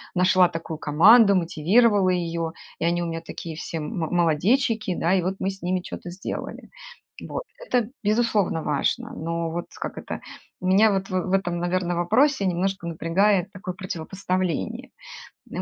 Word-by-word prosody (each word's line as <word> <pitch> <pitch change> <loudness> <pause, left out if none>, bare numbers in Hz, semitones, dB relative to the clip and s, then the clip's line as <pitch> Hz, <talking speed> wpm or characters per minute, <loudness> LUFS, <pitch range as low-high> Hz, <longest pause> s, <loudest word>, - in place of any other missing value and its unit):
нашла 185 0 +4
такую 165 -2 -6
команду, 200 +8 +6
мотивировала 185 +4 +3
её, 170 -2 -1 0.3
и 165 - -1
они 175 0 +1
у - - -2
меня 165 0 -4
такие 165 -2 -7
все 165 0 -5
мо 155 +2 -3
молодечики, 190 - +1
да, 170 +3 +1
и 190 - +3
вот 185 +2 -2
мы 190 - 0
с 195 0 -8
ними 180 +1 -1
чё-то 175 - -8
сделали. 185 +3 -6 0.6
Вот. - - -4 0.2
Это, 240 - 0
безусловно, 210 -6 +1
важно. 150 -2 -1
Но 165 +1 -3
вот, 170 +1 -4
как - - -5
это, - - -6 0.4
меня 195 +4 +4
вот 195 0 -1
в 185 0 -1
этом, 175 -3 0
наверно, 175 0 -1
вопросе 205 - +2
немножко 185 0 -1
напрягает 185 +4 +1
такое 185 -1 -6
противопоставление. 185 - -3 0.6
Ну - - -5
180 Hz, 155 wpm, -24 LUFS, 170-195 Hz, 0.6 s, команду